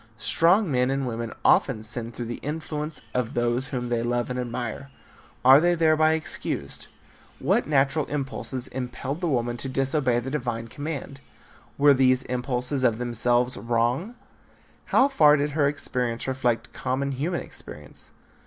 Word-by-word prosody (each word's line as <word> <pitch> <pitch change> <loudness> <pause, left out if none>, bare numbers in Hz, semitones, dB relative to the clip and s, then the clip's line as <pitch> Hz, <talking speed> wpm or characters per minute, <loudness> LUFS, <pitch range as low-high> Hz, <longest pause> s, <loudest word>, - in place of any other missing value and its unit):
Strong 175 - +3
men 125 -1 +2
and 135 0 -1
women 115 -2 -4
often 115 -6 +3
sin 115 +1 -2
through 120 +1 -6
the 120 +1 -5
influence 150 0 -4
of 125 -2 -2
those 120 +2 0
whom 125 -2 -4
they 120 -1 0
love 120 +1 -1
and 125 - -2
admire. 125 +2 -4 0.6
Are 135 +2 +9
they 175 +1 +3
thereby 155 -1 +4
excused? 155 - -3 0.5
What - - +1
natural 140 0 +2
impulses 135 -2 -3
impelled 130 +4 -5
the 175 - 0
woman 120 -3 0
to 135 - -3
disobey 135 -2 +1
the 130 +2 -5
divine 120 -5 -3
command? 145 -1 -6 0.6
Were 145 0 +6
these 130 -1 +3
impulses 125 +2 -2
of 115 -3 +3
themselves 120 +1 +1
wrong? 120 - 0 0.7
How 265 - +4
far 150 - +5
did 145 +1 -1
her 145 -1 +2
experience 125 -5 -2
reflect 125 -3 -1
common 130 +2 -2
human 155 +7 -2
experience? 75 -1 -9
130 Hz, 150 wpm, -25 LUFS, 120-145 Hz, 0.7 s, Are